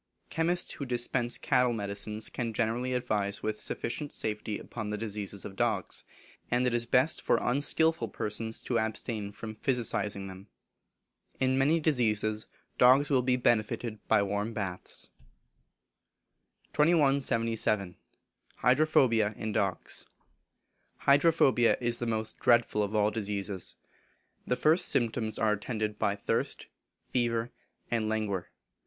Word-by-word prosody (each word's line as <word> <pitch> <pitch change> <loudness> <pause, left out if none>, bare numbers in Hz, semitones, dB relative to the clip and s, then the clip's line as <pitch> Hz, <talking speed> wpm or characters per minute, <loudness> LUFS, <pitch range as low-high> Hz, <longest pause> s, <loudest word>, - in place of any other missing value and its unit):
Chemists 170 +3 0
who 140 - -5
dispense 120 -1 -1
cattle 125 -1 +2
medicines 105 0 -2
can 115 -3 -4
generally 120 +3 0
advise 105 -5 -1
with 110 0 -2
sufficient 145 +4 -3
safety 105 -1 -3
upon 110 -3 -6
the 105 - -2
diseases 105 -2 -5
of 95 - -8
dugs, - - -1 0.5
and 125 +1 +2
it 125 - +1
is 120 0 0
best 130 +6 +3
for - - +2
unskilful 145 +1 +1
persons 110 +2 -3
to 120 -2 0
abstain 110 -1 -3
from 110 +1 -7
physicing 110 -4 -1
them. 95 +2 -10 0.9
In 130 0 +2
many 145 +5 +3
diseases 110 -8 +1 0.3
dogs 130 +4 +6
will 130 -2 +4
be 125 0 +2
benefited 115 -2 0
by 105 -2 +4
warm 100 +3 -2
baths. 95 -4 -5 1.6
2177. 115 - +2 0.6
Hydrophobia 125 -5 +3
in 110 - -3
Dogs. 95 -4 -2 0.9
Hydrophobia 140 -4 +4
is 120 -1 0
the 120 - -2
most 110 -1 -2
dreadful 120 -3 +3
of 105 +1 -2
all 105 0 +3
diseases. 100 -3 -4 0.7
The 125 - +1
first 155 +6 +4
symptoms 115 -4 +1
are 110 -1 +2
attended 105 0 -3
by 100 -2 +1
thirst, 100 - -2 0.4
fever, 120 -1 -1 0.4
and 110 -2 0
languor. 105 -4 -2
115 Hz, 125 wpm, -30 LUFS, 105-125 Hz, 1.6 s, dogs